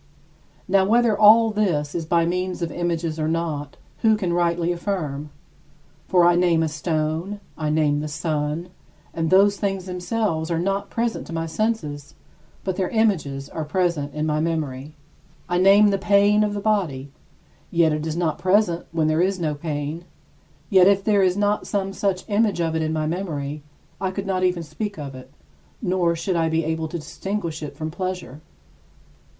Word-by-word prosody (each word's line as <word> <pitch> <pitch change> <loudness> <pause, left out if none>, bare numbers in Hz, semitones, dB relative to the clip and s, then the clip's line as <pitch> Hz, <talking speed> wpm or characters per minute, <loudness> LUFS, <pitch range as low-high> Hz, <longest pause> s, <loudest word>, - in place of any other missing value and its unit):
Now 195 0 +4
whether 230 +2 +3
all 220 +2 +7
this 170 -9 0
is 165 -2 -3
by 170 0 +3
means 180 +1 -2
of 165 - -3
images 165 -2 -2
or 155 - 0
not, 160 -3 -2 0.2
who 220 -1 +4
can 185 -5 -1
rightly 170 0 +1
affirm? 160 -6 -3 0.8
For 180 -2 +4
I 175 - +6
name 175 -2 +3
a - - +1
stone, 160 +5 -2 0.2
I 155 -1 -2
name 150 -1 +2
the 155 - -3
sun, 150 +2 -2 0.4
and 165 -1 -1
those 200 +2 +5
things 195 -2 -2
themselves 180 -2 -2
are 170 - 0
not 195 +3 -1
present 235 0 -2
to - - -7
my 165 0 -2
senses, 160 -6 -3 0.5
but 190 -2 -2
their 185 -2 0
images 160 - 0
are 160 - -5
present 155 -3 -1
in 150 0 -1
my 150 -1 0
memory. 155 -3 -3 0.5
I 175 0 0
name 200 +2 +6
some 195 - 0
pain 205 +2 +4
of 205 -1 -1
the 205 - -3
body, 165 -11 -1 0.6
yet 170 -3 +3
it 155 +1 -2
is 160 +1 -3
not 165 -3 -1
present 185 -2 +2
when 165 -1 0
there 155 +1 +2
is 190 +1 +1
no 155 -3 0
pain; 150 +2 -4 0.7
yet 190 -2 +7
if 200 -1 +3
there 210 -1 +3
were 185 -2 +3
not 205 0 0
some 195 -1 -2
such 195 -2 -1
image 210 -3 +1
of 165 -1 0
it 160 - 0
in 155 0 -1
my 155 -1 -1
memory, 155 -4 -3 0.4
I 190 - 0
could 195 +1 -4
not 185 -1 -1
even 180 -2 +1
speak 200 +7 -5
of 140 -3 -6
it, 130 0 -11 0.5
nor 180 -5 +1
should 175 +3 -2
I 165 -1 +1
be 160 +1 +1
able 160 0 -2
to 170 - -5
distinguish 170 +1 -4
it 150 - -7
from 155 0 -4
pleasure. 180 -5 -5
170 Hz, 180 wpm, -23 LUFS, 155-195 Hz, 0.8 s, all